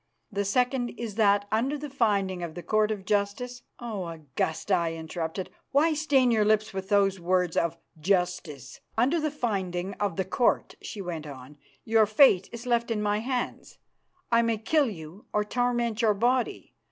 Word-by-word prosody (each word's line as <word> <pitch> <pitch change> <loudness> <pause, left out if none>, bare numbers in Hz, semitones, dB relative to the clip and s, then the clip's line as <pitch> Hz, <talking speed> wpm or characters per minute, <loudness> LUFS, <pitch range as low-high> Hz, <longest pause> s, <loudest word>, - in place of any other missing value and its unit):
The 200 0 -1
second 250 +3 +1
is 230 -3 -4
that 205 -1 +3
under 255 +7 +1
the 295 +1 -6
finding 200 -8 0
of 165 -2 -5
the 175 - -7
Court 215 0 +2
of 205 -3 -4
Justice 215 +5 -1
" - - -48
"Oh! 215 -7 -4
Augusta," 160 +3 -3
I 170 -2 +1
interrupted, 165 +2 -5 0.2
"why 310 +4 +3
stain 280 -5 +3
your 220 -2 +3
lips 215 0 +2
with 190 0 -5
those 195 -2 +3
words 180 0 +1
'of 170 0 0 0.2
justice'!" 180 -5 -1
" - - -39
Under 270 +9 +3
the 310 0 0
finding 195 -9 -2
of 200 -4 -1
the 190 - -1
Court," 235 +6 +1
she 200 - -6
went 165 -4 -5
on, 140 +1 -11 0.3
"your 220 -1 +4
fate 215 -4 +5
is 235 +1 -8
left 235 -1 +1
in 215 -2 -1
my 205 0 +1
hands. 250 +2 -4 0.5
I 230 0 +5
may 230 -1 +1
kill 280 +5 +2
you 170 +1 -10
or 210 - +2
torment 240 0 0
your 215 -3 +3
body. 245 +4 0
210 Hz, 180 wpm, -27 LUFS, 180-240 Hz, 0.5 s, fate